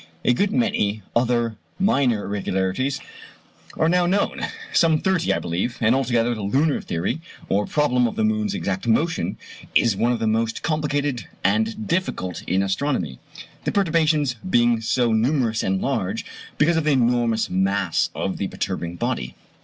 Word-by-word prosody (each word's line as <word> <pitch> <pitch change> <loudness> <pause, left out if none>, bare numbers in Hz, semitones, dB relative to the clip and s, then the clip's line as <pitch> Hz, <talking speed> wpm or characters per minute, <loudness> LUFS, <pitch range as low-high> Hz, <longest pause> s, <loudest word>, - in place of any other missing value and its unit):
A 125 - +5
good 200 +11 +1
many 110 - 0
other 120 -2 +1 0.2
minor 135 - +2
irregularities 100 +6 -1 0.8
are 160 - +3
now 175 +1 +3
known 200 +3 0 0.3
some 165 -2 +4
thirty, 185 -1 +1
I - - +2
believe; 90 +9 -2
and 115 0 +3
altogether 120 -3 +1
the 110 - -5
lunar 135 +9 +1
theory, 95 - -2 0.3
or 100 +1 +1
problem 125 -5 +2
of 115 - -5
the - - 0
moon's 110 -1 0
exact 95 +3 -3
motion, 165 +9 +1 0.4
is 115 -4 +4
one 120 +5 +1
of 120 - +1
the 115 - -2
most 115 +1 0
complicated 145 -4 -1 0.2
and 220 -1 +1
difficult 165 - -2
in 95 +2 +2
astronomy; 95 - -1 0.4
the - - -1
perturbations 155 -8 +2
being 120 -5 +3
so 120 +1 +1
numerous 115 -1 +1
and 95 0 0
large, - - -1 0.3
because 165 +2 +3
of 165 - +1
the 155 - +3
enormous 120 -3 +2
mass 95 -1 +1
of - - -2
the - - -2
perturbing 85 0 -4
body. 60 -7 -3
120 Hz, 155 wpm, -23 LUFS, 105-150 Hz, 0.8 s, A